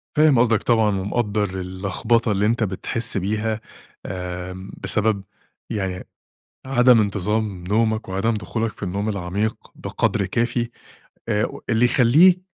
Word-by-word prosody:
فاهم 150 -4 +5
قصدك 115 -2 +3
طبعًا، 110 -4 +2
ومقدَّر 105 +1 -1 0.2
اللخبطة 100 +5 0
اللي 100 0 +1
أنت 115 +1 +1
بتحِسّ 110 +4 -2
بيها، 110 +3 -1 0.4
آمم، 90 +1 -6
بسبب 105 -2 +1 0.5
يعني 95 -5 -3 0.6
عدم 125 -3 +5
انتظام 100 -1 -1
نومك، 110 +2 0
وعدم 100 +5 0
دخولك 110 +1 -2
في - - -10
النوم 100 +3 -2
العميق 100 +2 -2 0.2
بقدر 100 -3 -1
كافي، 120 +4 -1 0.6
آآ 105 +1 +2
و - - -6
اللي 115 +2 +3
يخليك 145 +10 +5
110 Hz, 125 wpm, -22 LUFS, 95-115 Hz, 0.6 s, فاهم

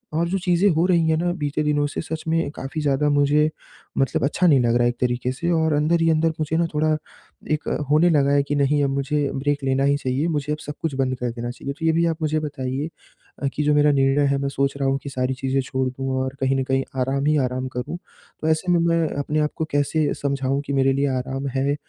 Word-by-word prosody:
और 170 +2 +1
जो 195 - 0
चीज़ें 180 +2 +2
हो 165 +2 +2
रही 170 -3 +3
हैं 160 - +3
ना 175 +2 0
बीते 150 0 -1
दिनों 145 -1 +1
से - - -4
सच 160 -1 -5
में 165 -2 +1
काफ़ी 145 +3 -5
ज़्यादा 145 0 +1
मुझे 145 +1 +3 0.5
मतलब 135 -3 +1
अच्छा 165 +6 +2
नहीं 145 -5 +5
लग 120 -1 +2
रहा 120 - +3
है 120 - +3
एक 120 - -5
तरीके 125 0 0
से 170 +6 -3
और 160 -2 +2
अंदर 155 +3 +2
ही 165 - +3
अंदर 160 +1 +2
मुझे 155 +1 0
ना 170 - +2
थोड़ा 155 +1 +2 0.6
एक 155 0 -1 0.2
होने 155 +4 +4
लगा 140 -3 +3
है 140 0 +3
कि, 145 +1 -2
नहीं 145 +1 +2
अब 140 - +1
मुझे 140 +1 0
ब्रेक 145 +1 -1
लेना 135 0 +1
ही 140 +1 +3
चाहिए 135 +3 -1
मुझे 150 -3 -2
अब - - -3
सब 150 - -5
कुछ 160 -4 -2
बंद 130 -1 0
कर 125 - -1
देना 120 0 -5
चाहिए, 140 +3 -6
तो 160 +3 -6
ये 160 - +4
भी 170 +1 +2
आप 165 -1 0
मुझे 155 0 +1
बताइए 140 -1 -3 0.5
अ, - - +2
कि 150 - 0
जो 150 0 +3
मेरा 150 0 +5
निर्णय 135 +1 +3
है 140 - +2
मैं 140 0 -1
सोच 140 0 0
रहा 135 -1 0
हूँ 135 - +1
कि 140 - -5
सारी 130 -1 -1
चीज़ें 135 0 -1
छोड़ 130 0 -2
दूँ 135 +1 -5
और 130 +1 -4
कहीं 135 0 +1
न - - 0
कहीं 135 +1 0 0.2
आराम 135 +2 0
ही 150 0 +3
आराम 130 +1 -3
करूँ। 125 +7 -4 0.4
तो 155 - -1
ऐसे 160 +3 +1
में 175 - +4
मैं 165 -1 +2
अपने 150 +2 -1
आप 150 0 +1
को 160 - -2
कैसे 145 +1 +1
समझाऊँ 140 -1 0
कि 140 - -3
मेरे 135 0 +3
लिए 140 +1 +1
आराम 135 +2 -3
है 140 +2 +1
145 Hz, 260 wpm, -22 LUFS, 135-155 Hz, 0.6 s, नहीं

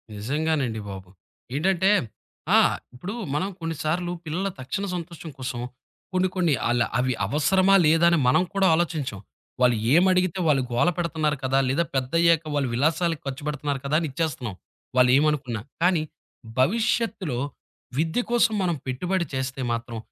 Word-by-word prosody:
నిజంగానండి 135 +1 -1
బాబు! 95 -1 -8 0.5
ఏంటంటే, 190 +5 +2 0.7
ఆ! - - +8 0.4
ఇప్పుడు 180 +11 -6 0.2
మనం 185 +6 0
కొన్నిసార్లు 165 +2 -2
పిల్లల 175 +5 -2
తక్షణ 195 +10 -3
సంతోషం 170 -1 -7
కోసం, 125 -2 -4 0.5
కొన్ని 185 0 +2
కొన్ని 175 -5 +2
ఆళ్ళ 120 0 +2 0.2
అవి 130 +1 +1
అవసరమా 185 - +3
లేదా 165 +2 +5
అని 170 - +3
మనం 130 +8 +4
కూడా 195 -1 +3
ఆలోచించం. 155 - -1 0.4
వాల్లేమడిగితే 170 - +3
వాళ్ళు 140 -4 +3
గోలపెడుతున్నారు 155 +2 0
కదా! 135 +1 +2
లేదా 145 +6 +1
పెద్దయ్యాక 165 +5 +3
వాళ్ళు 140 -3 0
విలాసాలకు 160 +5 +1
ఖర్చుపెడుతున్నారు 145 0 -3
కదా! 140 +2 0
అని 165 -3 -2
ఇచ్చేస్తున్నాం. 130 - -3 0.4
వాళ్ళు 125 -1 +6
ఏమనుకున్నా. 140 -7 0 0.2
కానీ, 175 -3 +3 0.6
భవిష్యత్తులో 200 - +1 0.6
విద్య 160 +9 +1
కోసం 235 -2 +3
మనం 175 -2 +1
పెట్టుబడి 175 +8 -1
చేస్తే 130 0 -3
మాత్రం. 115 0 -5
155 Hz, 130 wpm, -25 LUFS, 130-175 Hz, 0.7 s, ఆ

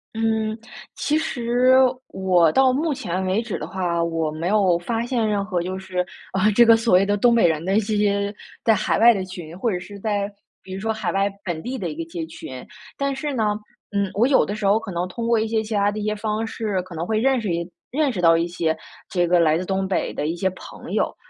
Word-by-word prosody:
嗯， 220 -1 0 0.4
其 300 - 0
实 250 -4 +2 0.3
我 180 -4 +3
到 265 +3 +4
目 305 +3 0
前 185 -6 -3
为 190 +4 +1
止 235 -2 -4
的 - - -5
话， 175 -3 -1
我 165 -2 -1
没 160 +4 -3
有 195 -5 +3
发 225 +6 -2
现 240 -3 0
任 205 -2 0
何 180 -4 -1
就 185 +1 -4
是 185 -1 -5 0.3
啊， 195 +3 +3
这 235 +3 +6
个 230 0 +8
所 225 -4 +3
谓 190 +2 +5
的 205 +1 +1
东 235 +4 +4
北 230 -7 +5
人 160 -1 0
的 190 +3 +1
一 - - +6
些 205 -1 0 0.3
在 225 - +6
海 - - 0
外 235 +1 +7
的 195 -3 -2
群， 175 -3 -9
或 225 +4 0
者 180 - -2
是 200 +3 -10
在 205 -1 -1 0.3
比 185 - -10
如 190 - -5
说 225 +2 0
海 220 -4 -2
外 195 +1 +2 0.2
本 170 -4 -3
地 260 +2 -4
的 180 -4 -3
一 150 - -6
个 165 - -4
街 165 -1 -4
群。 130 -5 -9 0.3
但 275 -1 -1
是 290 +2 -3
呢， 215 -4 0 0.4
嗯， 200 -1 0
我 225 +5 +3
有 275 - +4
的 205 - -4
时 210 -1 -4
候 200 +2 +4
可 225 -3 -6
能 175 +1 -2
通 230 +6 -5
过 230 -1 +4
一 220 - 0
些 220 0 0
其 220 0 -5
它 205 0 +2
的 205 - -4
一 210 - -3
些 210 0 0
方 215 +1 -2
式， 215 -4 -2
可 180 0 -12
能 165 +1 -4
会 220 - 0
认 260 +3 +2
识 215 -4 -3
一 170 +1 -3 0.2
认 285 +1 +1
识 195 - -5
到 165 -1 +5
一 165 - +1
些 170 -2 -1 0.3
这 175 -2 +1
个 175 +1 +3
来 160 -2 +4
自 180 - -3
东 190 0 -1
北 190 - -1
的 150 - -2
一 165 - -1
些 190 +2 0
朋 - - -10
友。 - - 0
200 Hz, 275 characters per minute, -22 LUFS, 180-225 Hz, 0.4 s, 个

